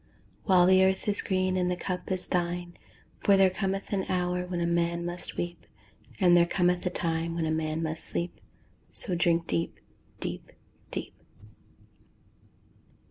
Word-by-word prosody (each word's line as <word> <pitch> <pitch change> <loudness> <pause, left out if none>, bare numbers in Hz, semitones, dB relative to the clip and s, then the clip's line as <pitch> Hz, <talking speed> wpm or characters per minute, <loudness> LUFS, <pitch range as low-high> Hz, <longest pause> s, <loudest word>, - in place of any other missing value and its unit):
While 185 -3 +6
the 185 +1 +6
earth 190 +2 +1
is 205 0 +2
green, 185 -1 0
and 180 -1 +1
the 180 - 0
cup 180 +1 -4
is 185 -1 -1
thine, 175 0 -2 0.4
For 200 -1 +4
there 190 -1 +5
cometh 195 +1 -2
an 190 -1 0
hour 180 0 0
when 175 -1 -3
a 170 - +1
man 170 0 0
must 175 +1 -5
weep, 175 0 -4 0.5
And 180 -3 +6
there 170 0 +5
cometh 180 0 +1
a - - +2
time 165 -1 -1
when 165 -1 -1
a 155 - 0
man 160 0 -1
must 160 0 -3
sleep, 175 +1 -4 0.5
So 185 - +2
drink 170 -1 +2
deep, 85 -1 -2 0.4
deep, - - -5 0.4
deep. - - -4
175 Hz, 160 wpm, -28 LUFS, 170-185 Hz, 0.5 s, While